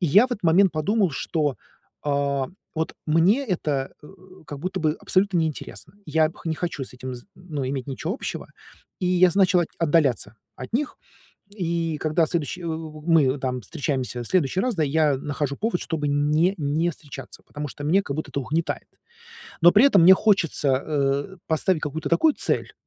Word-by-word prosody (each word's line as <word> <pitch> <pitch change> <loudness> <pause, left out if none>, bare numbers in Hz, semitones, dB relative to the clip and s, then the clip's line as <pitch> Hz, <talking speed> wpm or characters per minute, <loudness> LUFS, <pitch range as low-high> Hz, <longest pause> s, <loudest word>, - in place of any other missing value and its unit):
И 175 - +1
я 205 - +6
в - - -19
этот 210 - -5
момент 175 +3 +4
подумал, 190 +4 +1
что, 145 0 -1 0.5
а, 140 -2 0 0.3
вот 160 0 -2
мне 180 - +3
это, 150 - -2
э, - - -12 0.4
как 145 - -7
будто 185 +3 -3
бы 155 -1 +1
абсолютно 190 0 +1
не 160 - +2
интересно. 155 +2 -9
Я, 160 -1 +2
пх 165 - -14
не 160 - 0
хочу 165 -3 -4
с 125 - -15
этим 130 0 -6
з 120 - -11
ну, 155 -7 -5
иметь 135 -2 -3
ничего 150 +7 -3
общего, - - -6 0.5
и 180 - 0
я 180 0 +4
с - - -6
начал 185 -2 +4
от 165 - -1
отдаляться 145 -9 +1 0.2
от 130 - -8
них. 290 +5 -1 0.5
И 170 -5 -2
когда 155 +2 +1
следующий, 170 +2 -3
у 160 -1 -5
у - - -16
мы 150 -5 +3
там 125 -1 -3
встречаемся 125 +1 -3
в - - -9
следующий 185 +2 +1
раз, 250 0 0
да, 165 - 0
я 150 -1 +2
нахожу 140 0 -3
повод, 220 -3 -1
чтобы 150 -3 -2
не 150 +6 +2
не 155 +4 0
встречаться, 140 -5 -11
потому 145 0 -6
что 145 +2 -8
мне 185 +7 +3
как 140 - -5
будто 155 - -4
это 140 - -2
угнетает. 160 +5 -2 0.8
Но 175 - +9
при - - +6
этом 200 -10 +5
мне 185 - +9
хочется, 190 -9 +2 0.2
э, 145 +4 -1
поставить 160 +1 +1
какую-то 155 +1 -3
такую 290 - +3
цель, - - -2
160 Hz, 190 wpm, -24 LUFS, 145-180 Hz, 0.8 s, Но